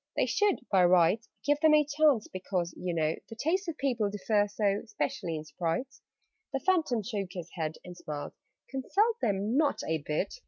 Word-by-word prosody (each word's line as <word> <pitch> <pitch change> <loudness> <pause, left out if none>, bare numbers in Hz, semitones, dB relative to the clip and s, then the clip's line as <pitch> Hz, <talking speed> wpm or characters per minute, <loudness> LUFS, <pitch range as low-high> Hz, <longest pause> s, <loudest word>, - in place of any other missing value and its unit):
"They - - +2
should, 415 -2 +1
by 190 -2 +5
rights, 180 +5 +4 0.2
Give 290 0 +3
them 310 0 +6
a 300 -1 +4
chance 295 -5 +3
because, 185 -2 -3
you 180 - -3
know, 160 -2 +1 0.2
The 225 - -8
tastes 355 - 0
of 325 -2 -4
people 240 -7 0
differ 205 +1 +1
so, 205 -1 +1
Especially 215 -5 -3
in 155 - -5
Sprites." 170 - -3 0.5
The 270 - -1
Phantom 310 - +1
shook 200 -4 -4
his 175 -2 -7
head 160 -3 -3
and 180 -1 -9
smiled. 150 -4 -6 0.4
"Consult 405 - +1
them? 205 +3 0
Not 295 -2 +2
a 160 0 0
bit! 150 - -3
210 Hz, 185 wpm, -30 LUFS, 175-285 Hz, 0.5 s, them